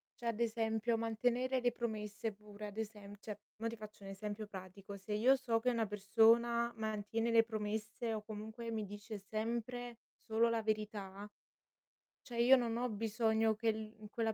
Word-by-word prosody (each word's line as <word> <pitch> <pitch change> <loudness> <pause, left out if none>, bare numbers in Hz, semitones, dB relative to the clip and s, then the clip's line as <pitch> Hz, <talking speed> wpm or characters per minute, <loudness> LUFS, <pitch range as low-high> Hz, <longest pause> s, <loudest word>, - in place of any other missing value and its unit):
cioè 235 - -5
ad 230 -1 0
esempio, 225 0 +1
mantenere 245 +3 +1
le 245 0 +3
promesse, 220 -2 -3
pure, 210 0 -9
ad 205 - -10
esem 210 -2 -5
cioè 210 -1 -6 0.2
mo 225 +1 -2
ti 230 - -3
faccio 210 -1 -10
un 195 - -7
esempio 205 +2 -4
pratico, 195 0 -8
se 195 +2 -5
io 240 +6 +6
so 235 -4 +1
che 250 - +2
una 230 -3 +1
persona 230 +3 +4
mantiene 220 +1 -1
le 225 0 +7
promesse 220 +1 -2
o 215 - -2
comunque 220 +2 -6
mi 220 -2 -1
dice 205 +2 -7
sempre 235 +4 -3 0.3
solo 225 +1 +3
la 230 -1 +1
verità, 210 -2 -2 0.9
cioè 240 -3 -6
io 255 +3 +9
non 235 -3 +1
ho 250 +1 0
bisogno 220 0 +2
che 225 +1 +2
l 215 -1 -7
quella 225 0 0
220 Hz, 170 wpm, -37 LUFS, 210-230 Hz, 0.9 s, io